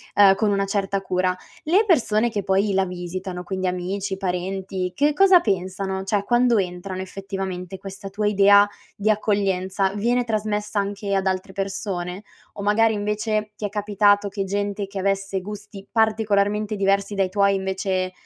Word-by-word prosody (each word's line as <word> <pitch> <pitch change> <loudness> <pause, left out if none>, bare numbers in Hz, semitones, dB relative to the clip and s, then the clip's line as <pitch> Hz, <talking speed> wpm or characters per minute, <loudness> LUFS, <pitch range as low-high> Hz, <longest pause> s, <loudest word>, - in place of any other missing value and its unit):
ehm, 195 -1 +7
con 210 0 +1
una 195 0 +1
certa 195 0 -1
cura, 185 -1 0 0.3
le 380 +8 +3
persone 235 - +3
che 205 -3 -3
poi 195 +1 +1
la 190 0 +2
visitano- 180 0 -5
quindi 190 -1 -2
amici, 190 +2 -3
parenti- 185 0 -3
che 295 +2 +2
cosa 380 +2 +6
pensano? 190 - -2
Cioè, 200 +1 0
quando 240 0 +3
entrano, 185 0 -3
effettivamente, 190 -1 -5
questa 195 +1 -8
tua 205 +1 -1
idea 200 0 +6 0.3
di 210 +2 0
accoglienza, 195 -2 +1
viene 240 +4 +1
trasmessa 210 -1 -1
anche 200 0 -3
ad 195 - 0
altre 185 0 -2
persone? 195 -1 -4 0.3
O 200 - -7
magari, 220 +2 +3
invece, 210 +1 -2
ti 210 - -5
è - - -2
capitato 205 0 +2
che 200 0 -3
gente 200 +1 -2
che 195 -1 -6
avesse 195 0 -1
gusti 205 0 -9
particolarmente 215 -1 +1
diversi 200 0 +1
dai 195 -1 +1
tuoi, 200 0 +3
invece, 190 -1 -1
200 Hz, 160 wpm, -23 LUFS, 190-210 Hz, 0.3 s, ehm